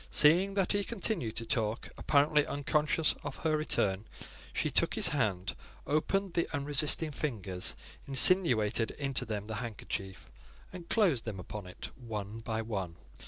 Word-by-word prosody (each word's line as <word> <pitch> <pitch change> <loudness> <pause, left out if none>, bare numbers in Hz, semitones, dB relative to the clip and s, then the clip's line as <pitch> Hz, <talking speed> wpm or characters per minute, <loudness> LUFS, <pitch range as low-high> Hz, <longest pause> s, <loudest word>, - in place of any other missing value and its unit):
Seeing 180 +6 +5
that 195 -2 +1
he 205 0 +1
continued 180 - -1
to 115 - 0
talk, 115 -3 -1
apparently 150 +1 +3
unconscious 150 +2 +1
of 145 -2 -5
her 155 -1 +3
return, 105 -10 +1 0.5
she - - -1
took - - +3
his - - +4
hand, 100 -10 -1 0.3
opened 185 +5 0
the 170 - 0
unresisting 145 +2 0
fingers, 100 - -2 0.3
insinuated 125 - +5
into 135 -3 -1
them 105 -3 -4
the 110 0 -5
handkerchief, 100 -4 -6 0.4
and 175 -2 -10
closed 175 - +2
them 105 -4 -5
upon 100 +1 -7
it 90 - -8
one 110 -3 -6
by 110 0 -3
one. 95 -7 -4
130 Hz, 145 wpm, -31 LUFS, 105-155 Hz, 0.5 s, Seeing